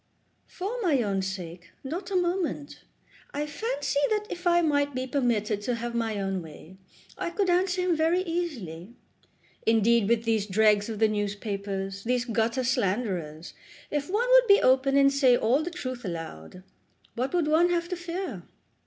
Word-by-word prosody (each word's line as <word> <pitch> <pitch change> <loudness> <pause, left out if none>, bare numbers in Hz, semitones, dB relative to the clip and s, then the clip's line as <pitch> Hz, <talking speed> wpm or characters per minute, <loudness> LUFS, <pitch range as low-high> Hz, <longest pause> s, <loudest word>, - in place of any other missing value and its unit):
"For 425 +7 -5
my 295 - +2
own 195 -2 -1
sake, 180 -2 -6
not 345 +8 -5
a 390 - -3
moment. 350 -5 -2 0.5
I 295 +1 -1
fancy 295 - -2
that 425 -1 0
if 355 +1 -4
I 345 0 +4
might 285 -3 +1
be 255 0 -2
permitted 230 -6 0
to 240 +3 -1
have 235 0 -4
my 225 -3 -1
own 195 -1 -2
way 160 +3 -13 0.4
I - - -2
could 370 +1 0
answer 360 +1 +1
him 360 -2 +2
very 330 +3 +2
easily. 240 - -5 0.7
Indeed 225 -1 +3
with 230 -1 +2
these 220 -3 0
dregs 210 +1 +3
of 220 - -4
the 220 +1 +4
newspapers, 200 -2 -3
these 245 +1 0
gutter 230 +2 0
slanderers, 190 -9 -2 0.4
if 290 +1 -2
one 440 +6 +1
would - - +6
be 400 0 +7
open 265 +2 +3
and 275 0 +5
say 260 -3 +4
all 245 +7 +2
the 335 - -3
truth 255 -7 -6
aloud, 165 - -7 0.5
what 255 +3 -2
would 335 -4 +1
one 325 +3 +4
have 340 -1 0
to 365 - -2
fear? 350 +2 -5
250 Hz, 170 wpm, -27 LUFS, 205-340 Hz, 0.7 s, be